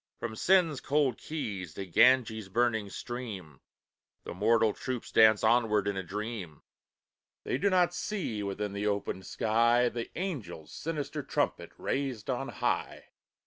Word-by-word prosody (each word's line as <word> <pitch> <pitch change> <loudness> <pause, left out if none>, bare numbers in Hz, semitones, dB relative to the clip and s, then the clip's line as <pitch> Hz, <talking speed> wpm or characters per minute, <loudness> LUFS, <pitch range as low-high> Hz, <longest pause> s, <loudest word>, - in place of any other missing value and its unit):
From 115 -1 -4
Seine's 175 - +3
cold 140 -4 +1
quays 100 - -5
to 100 - -5
Ganges' 110 +1 +4
burning 110 -1 +1
stream, 100 - -7 0.6
The - - -6
mortal 110 +3 +3
troupes 130 -3 -5
dance 110 -2 +6
onward 110 -4 +3
in 100 - 0
a 95 - -2
dream; 100 -4 -6 0.8
They 130 - -1
do 200 - +3
not 180 -2 +3
see, 180 - -3
within 100 0 -3
the 100 +1 -2
opened 100 -2 -2
sky, 115 +2 +3
The 120 -1 -5
Angel's 115 - -5
sinister 155 -3 -4
trumpet - - -1
raised 135 -4 -2
on 130 +2 -2
high. - - -2
110 Hz, 140 wpm, -30 LUFS, 100-130 Hz, 0.8 s, dance